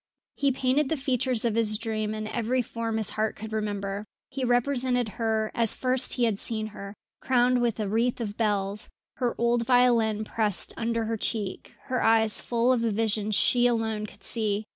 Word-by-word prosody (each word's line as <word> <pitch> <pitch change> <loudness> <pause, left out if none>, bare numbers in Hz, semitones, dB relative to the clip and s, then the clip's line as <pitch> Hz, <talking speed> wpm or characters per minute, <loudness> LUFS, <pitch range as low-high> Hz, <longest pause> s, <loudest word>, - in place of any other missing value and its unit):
He 280 -1 +2
painted 265 +2 +1
the 320 - 0
features 255 -3 0
of 230 - +1
his 215 -1 +1
dream 215 -1 -2
in 215 0 -4
every 240 +3 0
form 230 -1 -3
his 220 -2 +1
heart 215 0 -1
could 220 0 -8
remember. 205 -2 -2 0.3
He 265 0 -3
represented 245 -1 +1
her 220 +1 -1
as 230 -2 +1
first 255 0 +1
he 245 - 0
had 220 -4 +1
seen 220 -2 -2
her, 200 +1 -8 0.2
crowned 250 -1 +2
with 235 -2 0
a 210 - -1
wreath 230 +5 0
of 210 -3 -4
bells, 205 -1 -1 0.3
her 245 -2 -1
old 235 0 +1
violin 235 -4 +3
pressed 215 -3 -1
under 230 0 -1
her 225 0 -2
cheek, 205 -3 -3
her 255 -1 -2
eyes 220 -1 +3
full 240 +1 +2
of 245 - 0
the 230 - +1
visions 215 -1 0
she 245 +4 +4
alone 220 -3 -1
could - - -16
see. 215 -2 -1
225 Hz, 185 wpm, -27 LUFS, 215-245 Hz, 0.3 s, she